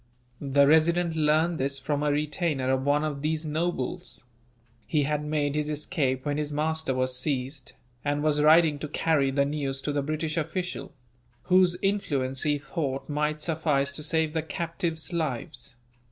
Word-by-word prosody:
The 140 0 +4
Resident 165 +3 +3
learned 155 +2 +2
this 135 +1 0
from 145 +2 -2
a 150 0 +2
retainer 150 -2 0
of 130 0 +1
one 145 +2 +2
of 145 -2 -3
these 155 +1 -1
nobles. 155 -5 -3 0.6
He 150 +4 +2
had 150 +1 -1
made 150 -1 0
his 150 0 -1
escape 145 -3 -1
when 145 0 -1
his 150 -1 -2
master 155 -2 -1
was 130 0 0
seized, 135 0 -2 0.3
and 145 0 0
was 150 -1 +2
riding 155 -1 +5
to 150 - -4
carry 150 -2 +1
the 140 +1 +2
news 140 -2 +1
to 150 - -1
the 145 0 0
British 155 +2 -2
official; 170 +3 -3 0.5
whose 180 -1 +4
influence, 140 -10 0
he 150 -1 +2
thought, 135 -1 -4
might 150 +1 -1
suffice 150 -4 +1
to 140 - -5
save 160 0 +1
the 160 - 0
captives' 165 +1 -3
lives. 150 -3 -3
150 Hz, 165 wpm, -27 LUFS, 140-160 Hz, 0.6 s, riding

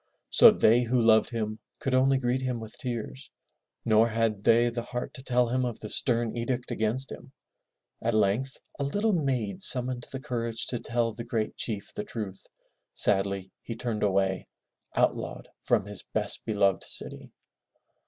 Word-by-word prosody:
So - - +9
they 115 +3 +4
who 125 +1 +1
loved 110 -1 +5
him 110 -2 -3 0.2
could 135 - -2
only 135 +1 +4
greet 130 0 0
him 125 -2 -2
with 110 -1 -9
tears, 115 - -5 0.6
nor 110 0 +5
had 110 -2 0
they 115 +2 +4
the 120 0 -3
heart 125 +1 -5
to 135 - -8
tell 125 -2 +1
him 130 +1 +1
of 120 -3 -3
the 105 - -5
stem 120 -2 +1
edict 120 +1 -2
against 115 +5 -1
him. 135 - -10 0.7
At 115 0 0
length 110 +6 +1 0.2
a - - 0
little 205 +10 +1
maid 130 - -1
summoned 125 -1 +2
the 135 - -4
courage 115 -4 -1
to 120 - -2
tell 115 -1 -1
the 115 +2 -6
great 110 -2 -2
chief 105 -4 -4
the 210 - -4
truth. 105 - -6 0.5
Sadly 95 -1 0
he 115 - -6
turned 115 -2 -3
away, 95 -2 +1 0.5
outlawed - - 0
from 110 -5 +1
his 105 -1 -7
best - - -2
beloved 100 -3 +2
city. - - -6
115 Hz, 165 wpm, -28 LUFS, 110-125 Hz, 0.7 s, So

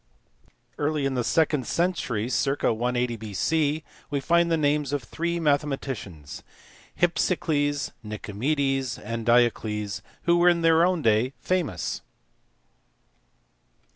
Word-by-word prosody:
Early 150 -1 0
in 135 - 0
the 125 -2 0
second 150 -2 +1
century, 145 - 0
circ. 135 +2 0
180 120 +1 0
B.C., 145 +9 0 0.3
we 140 0 -1
find 170 +4 +2
the 165 - +2
names 145 -2 +1
of 145 -3 -1
three 170 +8 -2
mathematicians 135 - -2 0.6
Hypsicles, 155 -4 +1
Nicomedes, 130 +5 -1
and 115 +1 -5
Diocles 110 -3 +2 0.2
who 175 0 +3
in 175 -1 +4
their 165 0 +5
own 180 -2 +1
day 110 -1 +4
were 130 - -7
famous. 180 -4 -2
140 Hz, 110 wpm, -26 LUFS, 115-160 Hz, 0.6 s, their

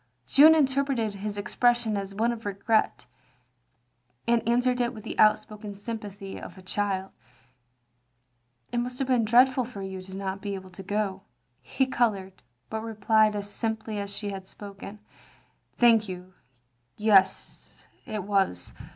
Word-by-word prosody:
Jeanne 310 - +7
interpreted 270 -6 +1
his 205 +1 -5
expression 240 +1 +1
as 195 0 -4
one 230 +3 +2
of 230 -1 -6
regret, 205 +2 0 1.2
and 235 0 +3
answered 250 +1 +2
it 240 0 -1
with 215 - -9
the 225 - -6
outspoken 215 -1 +2
sjrm 225 +3 -5
pathy 200 -2 -8
of - - -10
a - - -11
child: 195 0 -2 0.8
" 120 0 -45
It - - 0
must 250 +1 -3
have 270 - -2
been 250 -4 +3
dreadful 255 +3 +5
for 215 -5 -7
you 190 -1 -6
not 190 0 -3
to - - -20
be 200 -1 -3
able 190 -1 -9
to 185 - -10
go." 195 -1 -2 0.4
He 265 - 0
coloured, 200 -7 -1 0.3
but 220 0 -4
replied 220 -1 +2
as 205 0 -3
simply 220 -2 -3
as 200 0 -3
she 205 -2 -3
had 190 -1 -7
spoken: 200 +1 -9 0.4
" - - -38
Thank 225 -3 +5
you, 185 0 -8 0.6
yes, 210 -3 +2 0.2
it 215 -4 -3
was. 195 - 0
210 Hz, 155 wpm, -27 LUFS, 195-230 Hz, 1.2 s, Jeanne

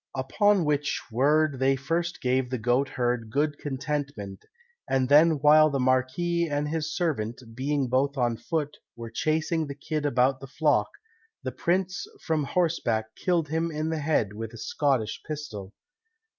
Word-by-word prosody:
Upon 185 +8 +2
which 145 -1 0
word 145 +3 +2
they 135 +1 +3
first 165 +6 -2
gave 130 0 +1
the 130 - -2
goatherd 120 -1 0
good 145 +4 0
contentment, 140 -8 -4 0.5
and 130 -1 +2
then 155 +3 +7
while 155 +1 +6
the 140 -2 -1
marquis 130 +7 +1
and 145 0 -1
his 160 0 -2
servant, 130 - -2
being 135 +2 -1
both 135 +3 +1
on 120 -2 +1
foot, 150 0 -3 0.2
were 115 -1 -8
chasing 155 +5 0
the 140 - -6
kid 150 +1 -3
about 130 0 +2
the 135 - -9
flock, 135 - +1 0.5
the - - -3
prince 190 +2 -1
from 155 -3 -1
horseback 120 -11 0
killed 170 -4 0
him 165 +2 0
in 155 0 -2
the 160 - -1
head 145 -9 0
with 115 +2 -6
a - - -9
Scottish 125 -3 -1
pistol. 110 -11 -6
145 Hz, 155 wpm, -27 LUFS, 130-155 Hz, 0.5 s, then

